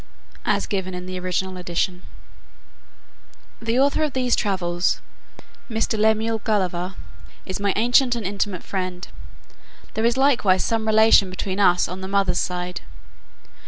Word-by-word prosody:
[As - - +1
given 190 -3 -3
in 180 0 -6
the 185 0 -5
original 185 +1 -2
edition.] 180 +1 -2 1.6
The 230 +2 0
author 280 +3 +3
of 305 -3 0
these 250 -2 +1
Travels, 175 -3 0 0.7
Mr. 225 0 0
Lemuel 220 +1 +2
Gulliver, 185 -4 -1 0.5
is 185 - -4
my 200 -1 +1
ancient 245 +2 +3
and 230 -4 -4
intimate 195 -1 -2
friend; 185 -2 -4 0.9
there 220 - -2
is 235 +2 +2
likewise 240 -9 +3
some 225 -1 -1
relation 220 -2 +5
between 185 +1 -4
us 180 -3 +4
on 185 +2 -7
the 190 - -5
mother's 195 -3 +1
side. 180 0 -3
195 Hz, 135 wpm, -23 LUFS, 185-225 Hz, 1.6 s, relation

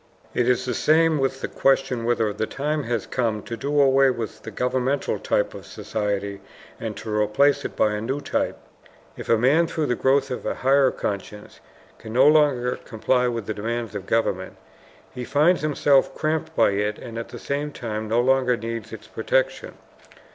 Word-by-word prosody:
It 120 0 +1
is 125 0 +1
the 125 - -1
same 160 +2 +3
with 135 0 -1
the - - -2
question 130 -3 +1
whether 115 -3 +1
the 110 +1 -2
time 150 +1 -2
has 115 -3 -2
come 115 -4 -1
to 115 - -5
do 145 +6 -1
away 135 -1 +5
with 115 -4 -4
the - - -7
governmental 125 +5 -1
type - - 0
of - - -9
society 100 -2 -3 0.4
and - - -5
to 110 -1 -4
replace 105 +7 +2
it - - -5
by 105 - +2
a 105 - -3
new 130 +6 -2
type. - - -2 0.6
If - - -9
a 115 - +5
man, 145 +9 +3
through 160 -2 -2
the 125 - 0
growth 135 +2 +2
of 125 - -4
a - - -2
higher 135 0 +3
conscience, 105 -2 -6 0.4
can 110 - -9
no 130 +4 +5
longer 145 -5 +3
comply 125 +3 0
with 115 -3 -3
the 110 - -3
demands 115 +2 -3
of 100 -2 -6
government, 115 0 -1 0.6
he 125 - -5
finds 150 +8 +3
himself 145 -2 +2
cramped 160 +1 -2
by - - +4
it 105 +1 -1
and 115 -2 -7
at 115 - -7
the - - -8
same 145 +1 -3
time 110 -5 -5
no 115 +2 +2
longer 130 -1 +2
needs 115 -1 -5
its 110 -1 -9
protection. - - -1
125 Hz, 190 wpm, -23 LUFS, 110-140 Hz, 0.6 s, away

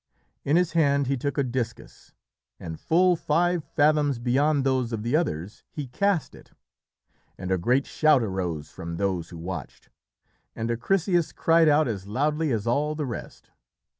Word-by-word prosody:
In 145 - +2
his 180 -1 +2
hand 140 -4 +2
he 135 +2 0
took 140 +3 -3
a 140 - +3
discus, 120 -2 -5 0.5
and 80 -2 -7
full 180 +2 +3
five 170 +1 +1
fathoms 150 -3 +2
beyond 135 +4 +1
those 130 -3 0
of 110 -2 -3
the 120 +5 0
others 105 - -2
he 150 - -6
cast 185 +6 0
it, - - -16 0.8
and 95 0 -5
a 95 - +3
great 125 +9 +2
shout 155 -5 +3
arose 90 -7 -3
from 85 -2 -6
those 95 -3 -1
who 85 - -9
watched, 85 -4 -7 0.7
and 115 +1 -2
Acrisius 175 - +1
cried 165 -1 +4
out 150 0 +4
as 100 -4 -4
loudly 150 +7 0
as 110 -4 -1
all 145 +6 0
the 150 -1 -2
rest. 120 -4 -8
135 Hz, 165 wpm, -26 LUFS, 105-155 Hz, 0.8 s, cried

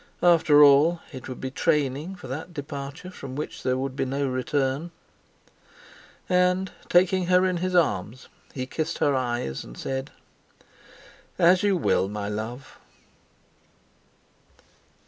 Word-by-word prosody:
After 160 -4 +6
all, 145 +4 +5
it 130 -3 -9
would 130 - -7
be 130 - -5
training 150 +6 0
for - - -11
that 160 +6 -6
departure 140 +4 -7
from 135 -7 -8
which 150 - -5
there 130 0 0
would 130 0 -3
be - - -1
no 135 +1 -1
return. 135 +4 -1 1.4
And, 180 +1 +2 0.2
taking 180 0 +3
her 180 +1 +4
in 185 -1 0
his 185 +1 -2
arms, 125 - 0 0.2
he 130 -2 -4
kissed 155 +5 -3
her 145 - +2
eyes, 120 - -2
and - - -12
said: 135 - -4 1.3
"As 180 +2 +5
you 200 -2 +2
will, 95 - +1
my 105 0 -4
love." 110 +5 -6
140 Hz, 130 wpm, -25 LUFS, 130-175 Hz, 1.4 s, After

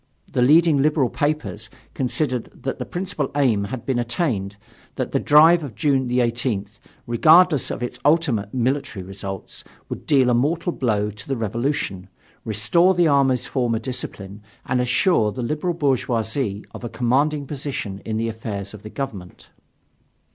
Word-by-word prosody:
The - - +1
leading 150 +2 +5
liberal 150 -3 +2
papers 145 -8 -2 0.2
considered 130 -1 -1 0.2
that 135 - -3
the - - -5
principal 185 +1 -2
aim 120 -8 +2
had 120 +3 -6
been 130 -3 0
attained, 120 - -1 0.4
that - - -3
the - - +1
drive 160 +3 +6
of 130 -7 -7
June 135 -4 +1
18, 120 -3 0 0.4
regardless 155 +5 +5
of - - -4
its 120 0 -5
ultimate 140 -10 +2
military 130 -5 -1
results, 95 0 -7 0.3
would - - -7
deal 130 -4 +4
a - - +3
mortal 160 +8 +1
blow 105 -7 0
to 105 -1 -11
the 135 - -2
revolution, 115 -4 -2 0.4
restore 170 - +3
the 175 -1 +4
army's 135 -4 +2
former 120 -4 0
discipline, 105 -4 -6 0.2
and 125 -1 +1
assure 125 - +2
the 125 +3 -5
liberal 155 +7 -1
bourgeoisie 120 -6 -1
of - - -10
a 120 - -4
commanding 140 +5 +1
position 130 -9 -5
in 110 -1 -3
the 115 +1 -1
affairs 105 -3 -5
of 105 - -10
the 105 - -9
government. 105 -9 -7
125 Hz, 155 wpm, -22 LUFS, 110-145 Hz, 0.4 s, drive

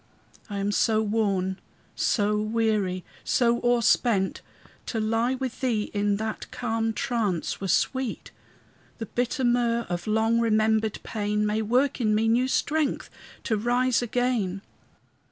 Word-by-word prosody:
I 205 - -4
am 200 +1 0
so 215 +2 +2
worn, 195 -3 0 0.4
so 210 -1 +1
weary, 215 -4 0 0.2
so 235 -1 +2
o'erspent, 235 -4 +2 0.5
To 225 - -2
lie 225 +4 +1
with 260 -2 -5
thee 230 -5 0
in 205 0 +1
that 220 +1 -4
calm 225 -2 -1
trance 220 - -2
were 195 - -2
sweet; 260 +7 -1 0.7
The 225 - -5
bitter 245 +4 -2
myrrh 240 -1 +2
of 175 +1 -3
long 220 +2 +2
remembered 220 -1 +2
pain 210 -1 -1
May 210 +1 0
work 250 +5 +1
in 215 -2 +2
me 220 +1 +2
new 240 +3 +3
strength 300 +2 0 0.3
to 225 - 0
rise 245 +3 +1
again. 235 -5 -1
225 Hz, 135 wpm, -26 LUFS, 210-240 Hz, 0.7 s, new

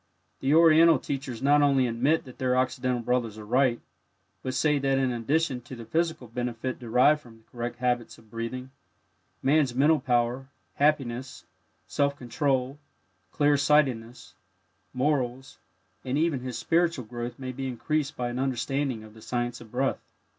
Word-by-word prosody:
The 135 +3 +2
Oriental 165 -1 +7
teachers 135 -3 -5
not 145 +1 +5
only 135 -3 +4
admit 125 +7 +1
that 130 - -13
their 125 -1 +1
Occidental 130 -1 0
brothers 115 -3 -1
are 105 - -9
right, 125 +1 +2 0.6
but 130 0 -4
say 150 +2 +2
that 135 0 +1
in 130 -1 +1
addition 130 +3 0
to 120 +2 -10
the 115 -1 -9
physical 160 -3 -1
benefit 120 +2 -4
derived 125 +5 +3
from 115 -4 -17
correct 120 0 -4
habits 120 -1 -1
of 110 -2 -21
breathing, 125 +3 -5 0.7
Man's 135 -2 +3
mental 150 +4 +4
power, 125 0 0 0.2
happiness, 135 -4 0 0.4
self 140 -1 0
control, 130 +1 -1 0.5
clear 145 0 +3
sightedness, 130 -5 +1 0.6
morals, 130 - -1 0.4
and 130 +1 -1
even 155 -3 +1
his 125 -2 -5
spiritual 165 0 +1
growth 120 +1 -6
may 130 -2 -5
be 135 +1 -5
increased 145 +4 -2
by 125 -1 -2
an 120 +1 -4
understanding 135 -1 -1
of 110 -1 -13
the 110 - -15
"Science 120 +1 -3
of 110 -2 -13
Breath." 130 +2 -1
130 Hz, 155 wpm, -27 LUFS, 120-145 Hz, 0.7 s, Oriental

